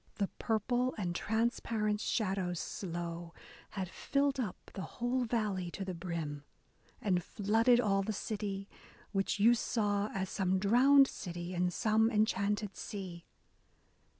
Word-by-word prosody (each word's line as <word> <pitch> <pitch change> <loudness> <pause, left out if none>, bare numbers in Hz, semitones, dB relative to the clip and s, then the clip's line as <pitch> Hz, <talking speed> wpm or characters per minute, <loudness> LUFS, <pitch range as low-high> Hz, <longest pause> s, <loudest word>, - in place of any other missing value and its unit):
The 200 -2 -1
purple 245 +3 +1
and 180 -4 -1
transparent 220 -1 0
shadows 190 -7 0
slow 170 -2 -5 0.3
Had 190 -2 -3
filled 275 +8 0
up 215 -8 -4
the 195 - -5 0.2
whole 245 +1 +1
valley 210 -6 -1
to 195 +3 -5
the 185 - -3
brim. 165 -4 -4 0.6
And 180 -4 +1
flooded 225 +6 +3
all 200 -4 +2
the 205 +3 -2
city, 200 -2 -3 0.4
which 195 0 0
you 230 +4 +7
saw 210 -3 0
As 190 -1 -2
some 190 -1 +1
drowned 255 +8 +6
city 175 -4 -6
in 180 0 +1
some 220 +3 +3
enchanted 210 -2 +1
sea. 185 -4 -6
205 Hz, 130 wpm, -33 LUFS, 185-225 Hz, 0.6 s, you